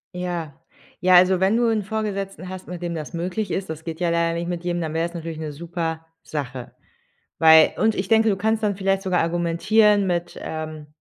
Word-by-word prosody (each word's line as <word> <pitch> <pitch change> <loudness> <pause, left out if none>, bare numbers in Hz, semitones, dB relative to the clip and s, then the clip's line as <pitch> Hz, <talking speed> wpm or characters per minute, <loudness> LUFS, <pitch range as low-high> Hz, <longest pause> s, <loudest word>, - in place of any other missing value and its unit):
Ja. 175 -4 -4 0.5
Ja, 185 +1 +5
also, 185 +1 +6
wenn 190 +3 +3
du 240 0 +2
'n 220 -2 0
Vorgesetzten 195 -3 -4
hast, 185 0 -8
mit 180 -1 -7
dem 170 -1 -3
das 155 +1 -6
möglich 180 +4 -3
ist- 190 -2 -3
das 160 0 -6
geht 165 0 -6
ja 175 -1 +1
leider 170 0 +1
nicht 170 0 -3
mit 175 -1 -4
jedem- 175 0 -1
dann 160 -2 -3
wär's 165 +1 -1
natürlich 165 -2 -6
'ne 155 -1 -5
super 165 0 -4 0.2
Sache. 130 -5 -6 0.7
Weil 160 -1 +7
und 220 0 +2
ich 190 0 -3
denke, 225 0 +4
du 200 - +2
kannst 220 +3 0
dann 205 -2 0
vielleicht 195 0 0
sogar 185 -2 +1
argumentieren 185 +5 +2
mit, 175 -1 -2
ähm 155 -1 -6
175 Hz, 205 wpm, -23 LUFS, 165-195 Hz, 0.7 s, Weil